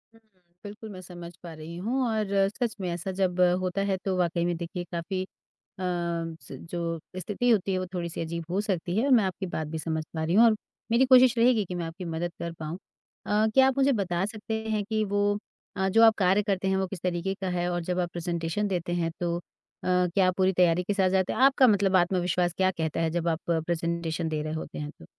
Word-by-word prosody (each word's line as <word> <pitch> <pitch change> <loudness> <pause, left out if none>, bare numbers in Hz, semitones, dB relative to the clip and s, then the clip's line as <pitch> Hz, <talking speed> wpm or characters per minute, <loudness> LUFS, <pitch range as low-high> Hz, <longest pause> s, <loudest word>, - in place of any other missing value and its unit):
हुँ, - - -20 0.4
बिल्कुल 210 +1 -9
मैं 185 -3 -9
समझ 175 -1 -10
पा 170 -2 -8
रही 160 +2 -9
हूँ 235 +9 -1
और 220 -2 0 0.2
सच 235 +2 -3
में 180 - -2
ऐसा 175 +2 -3
जब 185 -1 -1 0.2
होता 185 +1 -1
है 190 - +1
तो 190 -1 0
वाक़ई 170 -1 +1
में 175 0 0
देखिए 175 +1 -5
काफ़ी 185 +2 -3
अ, - - -10 0.5
स 170 -2 -3 0.2
जो 170 -1 -2 0.2
स्थिति 205 +6 -2
होती 200 -3 +2
है, 185 - +1
वो 185 - -3
थोड़ी-सी 170 -2 -3
अजीब 170 0 -4
हो 190 +3 +1
सकती 185 -3 -2
है 230 - +2
और - - +1
मैं 225 -4 +5
आपकी 190 +1 -3
बात 160 -3 -3
भी 160 +2 -4
समझ 160 0 -2
पा 160 -1 -1
रही 165 +2 0
हूँ 225 +4 +7
और 225 -2 +5 0.4
मेरी 240 +3 +5
कोशिश 255 -1 +7
रहेगी 230 -2 +4
कि 180 - -6
मैं 175 -1 -3
आपकी 165 +3 -7
मदद 170 +1 -3
कर 170 0 -4
पाऊँ। 160 +1 -6 0.5
अ, 210 +1 +3
क्या 265 0 +7
आप 265 - -1
मुझे 275 +1 +4
बता 190 -5 0
सकते 215 +1 -5 0.2
हैं 210 -1 0
कि 215 +1 0
वो 205 0 0 0.5
अ, 190 0 +1
जो 225 +4 +4
आप 225 -1 +7
कार्य 195 +1 +3
करते 195 -2 -1
हैं 190 - +2
वो 190 0 0
किस 185 -1 -7
तरीके 180 +1 -1
का 190 - -2
है 175 0 0
और 175 0 -1
जब 180 +1 -2
आप 175 -1 -2
प्रेज़ेंटेशन 170 +3 -2
देते 175 -2 -2
हैं 170 -1 0
तो 170 -1 0
अ, - - -8 0.5
क्या 180 +1 +3
पूरी 190 0 +3
तैयारी 180 -1 +3
के 205 - -1
साथ 190 -2 +3
जाते 190 -1 +1
हैं? - - -3
आपका 270 0 +6
मतलब 200 -4 +3
आत्मविश्वास 180 0 +1
क्या 190 0 +3
कहता 160 -3 -2
है 165 -1 +1
जब 170 +1 -1
आप 165 +1 -2
अ, 165 -1 +2
प्रेज़ेंटेशन 170 0 -2
दे 155 -1 -2
रहे 155 +1 -4
होते 160 - -6
हैं 150 0 -4
तो? 80 - -17
180 Hz, 240 wpm, -27 LUFS, 170-200 Hz, 0.5 s, हूँ